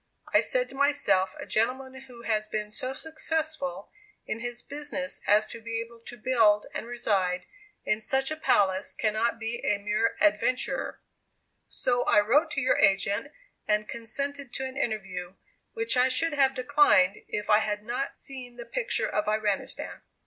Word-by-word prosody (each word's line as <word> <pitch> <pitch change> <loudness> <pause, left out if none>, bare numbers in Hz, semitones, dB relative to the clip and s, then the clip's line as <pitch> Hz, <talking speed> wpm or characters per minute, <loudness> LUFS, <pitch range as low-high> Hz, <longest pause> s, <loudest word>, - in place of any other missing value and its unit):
I - - +6
said - - 0
to - - -11
myself, 280 -10 +2
a - - -5
gentleman 260 +4 0
who 240 -2 -13
has 215 -2 0
been 210 0 -3
so 255 +4 0
successful 315 -1 -3 0.3
in 215 - -3
his 240 0 -4
business 285 -1 -5
as 210 +1 +5
to 230 - -8
be 230 0 -3
able 230 0 -8
to 240 - -9
build 215 -3 +3
and 230 - -4
reside 195 -7 0 0.4
in 215 - +1
such 265 +5 +1
a - - -1
palace 190 -10 +1
cannot 220 +2 0
be 230 +1 -4
a 205 - +2
mere 210 +3 0
'adventurer.' 265 -4 +1 0.6
So 245 -1 0
I - - +5
wrote 275 +10 +3
to 275 - 0
your 260 - +2
agent, 200 +7 +2 0.4
and 210 0 +2
consented 275 +4 -4
to 265 - -2
an 260 0 -6
interview, 195 -8 -3 0.4
which 450 - +1
I 250 +1 +5
should 295 +6 +2
have 270 -2 +3
declined, 255 -8 +4
if 210 - -3
I 210 - +7
had 210 -1 -2
not 245 +5 -3
seen 255 -3 -6
the 240 -1 -8
picture - - -1
of - - -1
Iranistan!" 210 -2 -1
240 Hz, 165 wpm, -28 LUFS, 210-275 Hz, 0.6 s, I